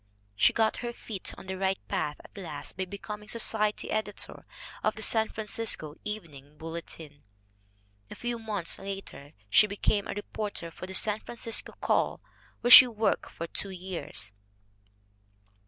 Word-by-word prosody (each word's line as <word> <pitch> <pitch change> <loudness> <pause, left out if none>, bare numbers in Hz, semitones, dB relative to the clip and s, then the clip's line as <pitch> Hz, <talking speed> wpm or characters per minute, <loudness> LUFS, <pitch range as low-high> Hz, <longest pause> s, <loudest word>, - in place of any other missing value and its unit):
She 100 - +5
got 220 -1 +2
her 240 -1 -4
feet 210 -5 -5
on - - -10
the 190 0 -5
right 190 0 +1
path 150 0 -1
at - - -17
last 155 -7 -6
by 190 - -2
becoming 210 +2 -7
society 215 -2 +2
editor 215 -1 -3 0.4
of 215 - +2
the 220 - -2
San 220 +1 +3
Francisco 215 -8 0
Evening 150 -9 -7
Bulletin. 160 -2 -7 0.9
A - - -8
few 240 -1 -3
months 210 -6 -2
later 195 -7 -7
she 210 - +6
became 205 0 0
a - - -4
reporter 205 -4 -4
for 185 - -8
the 190 - -5
San 210 +1 +3
Francisco 230 -1 -1
Call, - - +2 0.4
where 245 - +2
she 255 - +13
worked 225 -2 0
for 170 - -5
two 195 +4 -4
years. 180 - -4
200 Hz, 150 wpm, -29 LUFS, 170-220 Hz, 0.9 s, she